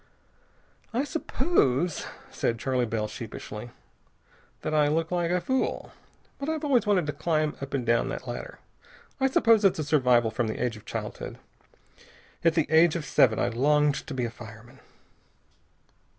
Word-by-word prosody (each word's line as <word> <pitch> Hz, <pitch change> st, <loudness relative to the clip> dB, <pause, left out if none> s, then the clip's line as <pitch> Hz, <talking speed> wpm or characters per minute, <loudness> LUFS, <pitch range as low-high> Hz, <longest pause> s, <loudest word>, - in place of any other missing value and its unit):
"I 255 Hz, -, +2 dB
suppose," 255 Hz, -, 0 dB, 0.2 s
said 115 Hz, -, -1 dB
Charley 125 Hz, 0 st, 0 dB
Bell 110 Hz, -1 st, -2 dB
sheepishly, 110 Hz, 0 st, -8 dB, 0.9 s
"that 155 Hz, -, -3 dB
I 150 Hz, -1 st, +4 dB
look 160 Hz, +3 st, 0 dB
like 175 Hz, -1 st, 0 dB
a 180 Hz, +1 st, +2 dB
fool. 260 Hz, +8 st, -1 dB, 0.5 s
But 280 Hz, +2 st, -3 dB
I've 315 Hz, -1 st, -2 dB
always 255 Hz, -7 st, +2 dB
wanted 190 Hz, -5 st, +3 dB
to 150 Hz, -, -3 dB
climb 155 Hz, 0 st, 0 dB
up 135 Hz, 0 st, -4 dB
and 125 Hz, -3 st, -2 dB
down 115 Hz, 0 st, +2 dB
that -, -, -5 dB
ladder. -, -, -6 dB, 0.6 s
I 265 Hz, -, +3 dB
suppose 230 Hz, -4 st, +4 dB
it's 195 Hz, -, +4 dB
a 155 Hz, -, -1 dB
survival 125 Hz, -6 st, +3 dB
from 115 Hz, +1 st, -1 dB
the 110 Hz, -, -3 dB
age 120 Hz, -2 st, -1 dB
of 105 Hz, -, -13 dB
childhood. -, -, -6 dB, 1.1 s
At 165 Hz, -1 st, +3 dB
the 160 Hz, -3 st, +3 dB
age 160 Hz, +1 st, +5 dB
of 165 Hz, -3 st, -3 dB
seven 110 Hz, -4 st, +4 dB
I -, -, +1 dB
longed 145 Hz, +4 st, +2 dB
to 140 Hz, -, -5 dB
be 125 Hz, -2 st, -1 dB
a 115 Hz, -, -4 dB
fireman." 115 Hz, +3 st, -13 dB
150 Hz, 165 wpm, -27 LUFS, 120-180 Hz, 1.1 s, age